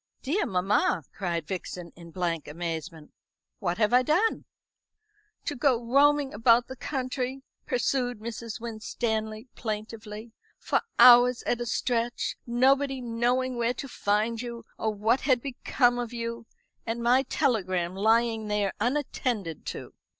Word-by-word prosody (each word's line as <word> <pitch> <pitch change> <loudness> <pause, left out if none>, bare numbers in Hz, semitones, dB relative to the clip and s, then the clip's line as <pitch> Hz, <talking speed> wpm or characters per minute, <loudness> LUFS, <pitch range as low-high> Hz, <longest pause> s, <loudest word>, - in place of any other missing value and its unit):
"Dear 345 +10 0
mamma," 185 -2 +1
cried 170 -5 -2
Vixen, 180 -1 -6
in 170 -1 -12
blank 170 -2 -2
amazement, 160 -1 -5 0.5
"what 175 -4 -1
have 215 +1 +2
I 250 - +7
done?" 350 - +1 1.0
"To 290 - -2
go 250 -1 +2
roaming 280 +3 +3
about 230 +3 +4
the 260 - -7
country," 260 0 -3 0.2
pursued 245 -1 0
Mrs. 230 +1 -6
Winstanley 220 0 -3
plaintively, 215 0 -6 0.2
"for - - 0 0.2
hours 245 0 +8
at 240 - -1
a 240 - -3
stretch, 235 0 -1
nobody 270 +3 +2
knowing 245 +2 0
where 235 +1 0
to 275 - -6
find 220 0 0
you 235 -1 -7
or 220 - -1
what 220 +5 +1
had 260 -3 +3
become 245 -1 +1
of 240 -1 -4
you. 230 -1 -5 0.4
And 235 +1 -3
my 245 +2 +5
telegram 185 - 0
lying 225 +2 +2
there 210 -2 0
unattended 240 - -2
to." - - -6
235 Hz, 135 wpm, -27 LUFS, 210-250 Hz, 1.0 s, hours